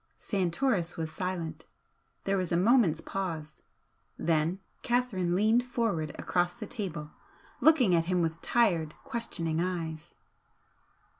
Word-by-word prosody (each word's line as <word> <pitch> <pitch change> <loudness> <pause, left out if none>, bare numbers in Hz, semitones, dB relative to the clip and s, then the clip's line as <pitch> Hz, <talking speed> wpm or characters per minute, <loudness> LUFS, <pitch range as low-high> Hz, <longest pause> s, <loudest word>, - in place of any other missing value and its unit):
Santoris 185 -1 0
was 160 -1 -3
silent. 170 -4 -4 0.6
There 195 - +1
was 185 -3 -1
a 170 - +3
moment's 190 -5 +4
pause. 160 -6 -4 0.6
Then 165 +3 +1 0.2
Catherine 220 -8 +1
leaned 220 +5 +4
forward 225 -11 -1
across 175 0 0
the 230 - -6
table, 175 -10 -5 0.5
looking 280 - +5
at 165 -1 +3
him 180 0 +1
with 165 0 -2
tired, 170 -10 +2
questioning 165 -8 -2
eyes. 165 -3 -4
180 Hz, 120 wpm, -30 LUFS, 165-215 Hz, 0.6 s, looking